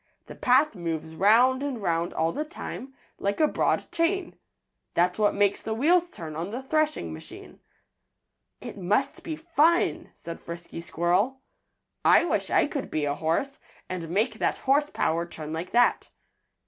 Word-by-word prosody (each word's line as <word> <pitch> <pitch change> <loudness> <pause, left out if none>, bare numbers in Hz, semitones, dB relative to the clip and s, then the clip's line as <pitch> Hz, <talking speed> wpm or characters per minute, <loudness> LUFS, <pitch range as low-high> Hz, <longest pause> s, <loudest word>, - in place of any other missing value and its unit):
The - - -10
path 260 +4 +3
moves 165 -4 -4
'round 235 +8 +4
and 280 -4 -3
'round 170 -3 0
all 160 +1 0
the 300 - -2
time, 270 -3 -8 0.2
like 200 +1 -1
a 310 - +5
broad - - 0
chain. 345 +2 0 0.6
That's 180 +3 +2
what 210 -1 +3
makes 200 -1 +2
the 220 - -3
wheels 345 +8 +3
turn 160 - -8
on 165 +4 -3
the 245 +5 -5
threshing 310 - 0
machine." 80 - -11 1.0
"It - - -8
must 210 +10 0
be 325 -2 -4
fun," 335 +1 +2
said 170 0 -8
Frisky 170 0 -8
Squirrel. 180 +10 0 0.6
"I - - +6
wish - - -1
I - - +4
could 290 -2 -4
be 155 -1 -1
a 145 - 0
horse, 165 - -1 0.3
and 175 -3 -5
make 210 +8 0
that - - +1
horse 290 +2 +2
power 165 +1 0
turn 155 -2 -7
like 165 +3 -4
that." 240 +1 +3
210 Hz, 160 wpm, -26 LUFS, 170-280 Hz, 1.0 s, I